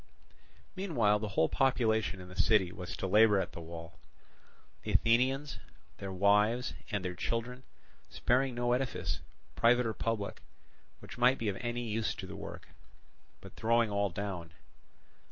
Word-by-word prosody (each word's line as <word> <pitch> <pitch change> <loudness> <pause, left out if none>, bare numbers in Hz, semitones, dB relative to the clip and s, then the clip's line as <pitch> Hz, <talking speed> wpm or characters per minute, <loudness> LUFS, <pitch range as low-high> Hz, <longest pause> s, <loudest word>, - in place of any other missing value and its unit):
Meanwhile 120 - +2
the 110 - -3
whole 85 -5 +2
population 110 -6 +1
in 90 - -9
the 90 - -11
city 95 -1 +3
was 90 0 -7
to - - -3
labour 105 +1 +5
at - - -2
the 85 - -8
wall, 85 0 -9 0.8
the - - -4
Athenians, 130 +5 +2 0.4
their 100 -1 -5
wives, 105 +6 +3 0.2
and 100 -3 -2
their 90 - -2
children, 115 +7 -3 0.5
sparing 130 +1 +1
no 120 0 +1
edifice, 110 - -2 0.3
private 120 +1 +4
or 110 - -1
public, 110 -2 -3 0.6
which - - -10
might 125 +2 +5
be 110 - -1
of 95 - -3
any 120 0 -2
use 110 -1 -1
to - - -7
the - - -8
work, - - -8 0.7
but - - -12
throwing 115 -1 +2
all 100 0 +1
down. 90 -3 -5
110 Hz, 155 wpm, -32 LUFS, 95-120 Hz, 0.8 s, labour